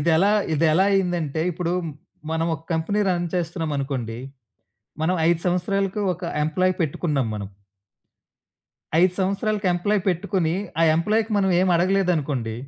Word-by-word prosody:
ఇదెలా 170 Hz, +6 st, +3 dB, 0.2 s
ఇదెలా 160 Hz, +4 st, +3 dB
అయిందంటే 175 Hz, -6 st, 0 dB
ఇప్పుడు 175 Hz, 0 st, -2 dB, 0.6 s
మనం 160 Hz, 0 st, 0 dB
ఒక 160 Hz, -, -9 dB
కంపెనీ 165 Hz, +6 st, 0 dB
రన్ 175 Hz, -1 st, -1 dB
చేస్తున్నాం 165 Hz, -2 st, -2 dB
అనుకోండి. 125 Hz, -5 st, -3 dB, 0.8 s
మనం 175 Hz, +3 st, +1 dB
5 170 Hz, -, +2 dB
సంవత్సరాలకు 195 Hz, +3 st, 0 dB
ఒక 175 Hz, -, -14 dB, 0.2 s
ఎంప్లాయీ 185 Hz, +4 st, +1 dB
పెట్టుకున్నాం 145 Hz, -4 st, -1 dB
మనం. 100 Hz, -2 st, -5 dB, 1.5 s
5 180 Hz, 0 st, +4 dB
సంవత్సరాలకి 200 Hz, +2 st, -1 dB
ఎంప్లాయీ 205 Hz, +3 st, 0 dB
పెట్టుకొని 175 Hz, -1 st, 0 dB, 0.3 s
ఆ -, -, +5 dB
ఎంప్లాయీ‌కి 215 Hz, +6 st, +1 dB
మనమేమడగలేదనుకోండి 175 Hz, -, +1 dB
175 Hz, 115 wpm, -23 LUFS, 160-190 Hz, 1.5 s, ఆ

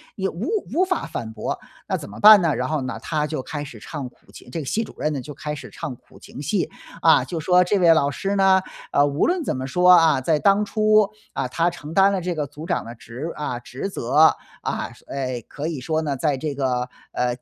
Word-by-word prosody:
也 190 Hz, -1 st, -1 dB
无 190 Hz, +4 st, -4 dB, 0.3 s
无 355 Hz, -, +3 dB
法 370 Hz, -2 st, -1 dB
反 110 Hz, -1 st, -5 dB
驳， -, -, -4 dB, 0.3 s
那 -, -, 0 dB
怎 -, -, -6 dB
么 100 Hz, -, -10 dB
办 210 Hz, -1 st, +9 dB
呢？ 165 Hz, -4 st, +1 dB
然 125 Hz, -, -1 dB
后 155 Hz, 0 st, -1 dB
呢， 130 Hz, 0 st, -4 dB
他 150 Hz, -2 st, -1 dB
就 155 Hz, -1 st, -3 dB
开 145 Hz, +1 st, -5 dB
始 125 Hz, -6 st, -10 dB
唱 135 Hz, +3 st, -6 dB
苦 -, -, -25 dB
情 -, -, -13 dB
这 145 Hz, -, -4 dB
个 150 Hz, -, -5 dB
系 220 Hz, -, 0 dB
主 -, -, -11 dB
任 155 Hz, -, -1 dB
呢， 140 Hz, -, -3 dB
就 145 Hz, -, -9 dB
开 150 Hz, +1 st, -5 dB
始 150 Hz, -, -8 dB
唱 130 Hz, -, -6 dB
苦 -, -, -20 dB
情 -, -, -10 dB
戏， 165 Hz, +7 st, -1 dB, 0.3 s
啊， 160 Hz, -, +5 dB
就 170 Hz, -, -4 dB
说 180 Hz, +3 st, +4 dB
这 190 Hz, +3 st, +1 dB
位 170 Hz, -3 st, +6 dB
老 140 Hz, -3 st, +2 dB
师 195 Hz, +7 st, -2 dB
呢， 190 Hz, -1 st, +5 dB, 0.3 s
呃， 145 Hz, -, +4 dB
无 145 Hz, +1 st, +1 dB
论 355 Hz, -1 st, 0 dB
怎 -, -, -2 dB
么 130 Hz, 0 st, -4 dB
说， 180 Hz, +6 st, +4 dB
啊， 165 Hz, -5 st, +6 dB
在 150 Hz, +4 st, +1 dB
当 200 Hz, +3 st, +3 dB
初， 215 Hz, 0 st, +3 dB, 0.3 s
啊， -, -, -2 dB
他 165 Hz, +7 st, +1 dB
承 160 Hz, -3 st, -9 dB
担 195 Hz, +2 st, +5 dB
了 195 Hz, -, 0 dB
这 180 Hz, 0 st, -2 dB
个 150 Hz, -3 st, -3 dB
组 150 Hz, +3 st, -10 dB
长 175 Hz, -, -1 dB
的 115 Hz, +1 st, -9 dB
职 125 Hz, +8 st, -7 dB
啊， 135 Hz, -5 st, -3 dB
职 125 Hz, +7 st, -6 dB
责， 155 Hz, -3 st, +4 dB, 0.3 s
啊， -, -, -2 dB, 0.2 s
哎， 130 Hz, -3 st, -3 dB
可 150 Hz, +2 st, -5 dB
以 160 Hz, -4 st, -3 dB
说 155 Hz, +5 st, -1 dB
呢， 145 Hz, -3 st, -2 dB
在 145 Hz, 0 st, 0 dB
这 145 Hz, +1 st, -3 dB
个， 125 Hz, -2 st, -1 dB, 0.2 s
呃， 125 Hz, -, 0 dB
155 Hz, 260 characters per minute, -23 LUFS, 135-180 Hz, 0.3 s, 办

